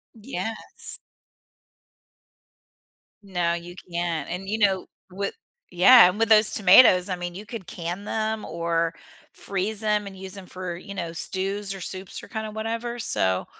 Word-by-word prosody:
Yes. 220 0 -7 2.2
No, 175 -3 -1
you 170 +1 -7 0.2
can't, 170 -2 -3
and, 190 +3 -6
you 220 - -1
know, 195 -3 +1 0.2
with 195 +2 -4 0.4
yeah, 190 +2 +8
and 205 +4 -6
with 225 - +2
those 215 0 +8
tomatoes, 185 -2 +6
I 185 - -2
mean, 175 0 -6
you 205 +3 -9
could 215 -5 -8
can 175 +3 -6
them 220 0 -3
or 165 0 -2 0.4
freeze 200 +3 0
‘em 210 -1 0
and 195 -1 -10
use 190 0 -7
‘em 185 - -11
for, 185 -1 -6
you 200 +3 -10
know, 170 -3 -5
stews 195 +3 +2
or 195 - -9
soups 185 +1 -4
or - - -12
kind 220 -1 -5
of 215 - -10
whatever. 230 +2 -4
So, 95 - +1
195 Hz, 160 wpm, -24 LUFS, 175-215 Hz, 2.2 s, yeah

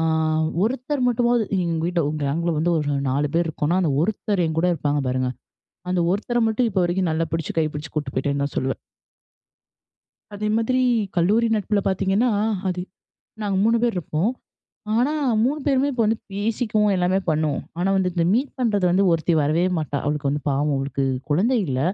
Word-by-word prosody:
அ - - +1 0.6
ஒருத்தர் 255 +4 -1
மட்டுமாவது 240 -1 +2 0.2
எங்க 165 -1 -1
வீட்டில 175 -1 0
ஒரு 155 - -3
கேங்கில 165 +5 0
வந்து 170 +3 +1
ஒரு 150 -1 -1 0.2
4 145 +3 0
பேர் 170 0 +2
இருக்கோம்னா, 160 +3 0
அந்த 165 - +1
ஒருத்தர் 200 0 0
என்கூட 160 +2 0
இருப்பாங்க 145 -1 -1
பாருங்க. 130 0 0 0.6
அந்த 180 - +1
ஒருத்தர 230 +5 -1
மட்டும் 225 +2 +1
இப்போ 190 -3 0
வரைக்கும் 175 0 0
நல்லா 165 +1 0
பிடிச்சு 165 -2 -3
கை 160 - +2
பிடிச்சு 150 +2 -7
கூட்டு 145 -3 -3
போயிட்டேன்னு 140 +1 -1
தான் 140 - -4
சொல்லுவேன். 130 0 -1 1.6
அதே 210 +1 -2
மாதிரி, 255 +3 +1 0.4
கல்லூரி 210 +7 +3
நட்புல 210 0 0
பார்த்தீங்கன்னா, 195 +5 +1 0.4
அது 180 -1 -2 0.6
நாங்க 200 -2 -1
3 230 +1 +4
பேரு 240 -1 +2
இருப்போம். 170 +5 -1 0.7
ஆனா 260 +6 +2 0.3
3 285 +5 0
பேருமே 275 0 +2
இப்போ 245 -3 0
வந்து 220 +1 +1
பேசிக்குவோம், 210 0 0
எல்லாமே 180 +1 +2
பண்ணுவோம். 155 -2 0 0.2
ஆனா 180 +2 +1
வந்து 185 -1 +1
இந்த 170 -2 +1
மீட் 265 +3 0
பண்றது 215 -7 +1
வந்து 185 +3 +3
ஒருத்தி 165 +1 +1
வரவே 155 +4 +2
மாட்டா. 150 -2 -3
அவளுக்கு 145 -1 -1
வந்து 145 +1 -2
பாவம் 145 +2 +1
அவளுக்கு 135 0 -2 0.3
குழந்தை 210 - +2
இல்ல. 130 -2 -1
180 Hz, 170 wpm, -22 LUFS, 150-220 Hz, 1.6 s, 3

